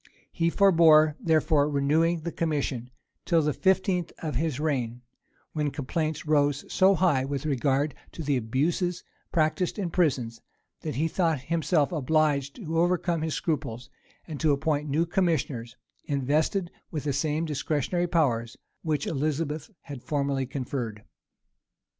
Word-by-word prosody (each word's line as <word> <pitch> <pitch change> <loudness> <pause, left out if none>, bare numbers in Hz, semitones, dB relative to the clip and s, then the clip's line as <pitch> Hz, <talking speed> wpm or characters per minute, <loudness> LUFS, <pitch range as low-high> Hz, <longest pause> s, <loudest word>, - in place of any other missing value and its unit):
He 165 0 +1
forbore, 160 -5 +5
therefore, 155 -2 +2
renewing 155 +4 +2
the 170 +2 -4
commission, 140 -7 -2 0.3
till 165 -2 +2
the 150 0 +1
fifteenth 190 -1 +1
of 155 -2 -4
his 150 0 -1
reign; 125 -6 -2 0.5
when 150 -2 0
complaints 155 +3 -3
rose 145 -2 +2
so 190 +1 +5
high 160 -7 +2
with 140 +1 -3
regard 140 +1 +1 0.2
to 165 - -6
the 145 -1 +1
abuses 160 - 0 0.3
practised 165 +4 +1
in 185 -5 -2
prisons, 130 -10 0 0.4
that 155 - -5
he 155 +4 +1
thought 165 -4 0
himself 155 +1 +1
obliged 150 -2 +1
to 165 -7 -2
overcome 175 -1 +1
his 160 -1 -1
scruples, 135 -7 -3 0.4
and 155 -4 -6
to 155 -2 +3
appoint 150 +1 -1
new 155 +4 +2
commissioners, 150 - -1 0.3
invested 150 +6 0 0.2
with 155 -3 -4
the 145 -2 -1
same 150 +3 0
discretionary 155 +3 -1
powers 120 -9 0 0.2
which 155 -3 -1
Elizabeth 155 +3 -2
had 140 -5 -9
formerly 140 -2 -1
conferred. 120 -5 -4
155 Hz, 135 wpm, -27 LUFS, 140-165 Hz, 0.5 s, forbore